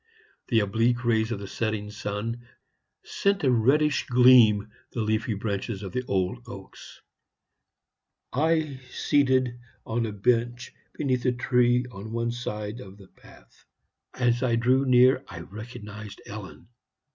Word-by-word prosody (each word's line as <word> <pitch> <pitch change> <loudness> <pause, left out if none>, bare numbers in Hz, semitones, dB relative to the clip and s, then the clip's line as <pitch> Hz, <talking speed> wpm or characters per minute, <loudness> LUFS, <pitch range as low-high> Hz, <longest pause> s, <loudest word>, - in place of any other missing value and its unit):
The 115 -3 +3
oblique 115 +4 +1
rays 110 -1 +2
of 115 - -1
the 100 0 -7
setting 105 0 -3
sun 110 +3 -5 0.6
sent 200 -2 0
a 130 - +4
reddish 140 +6 +2
gleam 120 -4 +6 0.2
the 120 - -2
leafy 110 +1 0
branches 100 0 -3
of 95 - -6
the 125 +6 -2
old 95 +4 0
oaks. 95 -5 -11 1.3
I 155 -1 +1
seated 130 -3 +1 0.3
on 115 0 -1
a - - -4
bench 120 +3 0 0.2
beneath 130 -3 -1
a 125 - +4
tree 125 0 +2
on 100 +1 -9
one 115 0 -1
side 105 -2 -5
of 100 -4 -11
the 95 -2 -16
path. - - -20 0.5
As 120 -1 +1
I 125 -3 +2
drew 130 +3 +2
near 130 +1 +5
I 85 -2 -8
recognized 105 +1 -9
Ellen. 100 0 -10
115 Hz, 135 wpm, -26 LUFS, 105-125 Hz, 1.3 s, gleam